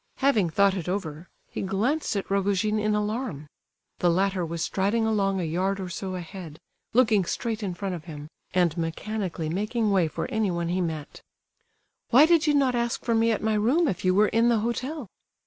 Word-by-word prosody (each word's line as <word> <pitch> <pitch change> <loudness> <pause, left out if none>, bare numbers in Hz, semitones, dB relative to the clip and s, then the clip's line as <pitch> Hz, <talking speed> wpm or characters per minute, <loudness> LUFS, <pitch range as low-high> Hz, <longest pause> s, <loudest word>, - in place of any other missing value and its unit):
Having 245 -10 +2
thought 200 +4 +3
it 180 -2 -4
over, 175 -3 -4 0.2
he - - -4
glanced 215 +10 0
at 200 - -2
Rogojin 200 +2 +1
in 215 0 +1
alarm. 210 - -2 0.5
The 175 - +3
latter 190 +1 +1
was 165 0 -3
striding 205 +4 0
along 195 -3 +1
a - - -1
yard 185 +5 -1
or 185 -1 -5
so 185 +2 -4
ahead, 170 -3 -8 0.3
looking 220 -5 +4
straight 225 +5 -3
in 190 -4 -3
front 195 +1 -3
of 170 -2 -7
him, 150 -3 -8 0.2
and 175 -4 +2
mechanically 170 0 -3
making 210 +6 -1
way 185 -4 +3
for - - -4
anyone 180 -7 0
he 185 +1 0
met. 160 -4 -5 0.9
"Why 270 +6 +7
did 330 -1 +3
you 295 - +4
not 270 -3 +3
ask 235 -1 -1
for 235 - +1
me 225 0 +3
at 215 - -1
my 220 0 +1
room 250 +11 +2
if 185 -8 -2
you 185 0 +3
were 210 +1 +4
in 230 +1 +3
the 235 - +3
hotel?" 255 +4 -3
200 Hz, 195 wpm, -26 LUFS, 180-225 Hz, 0.9 s, Why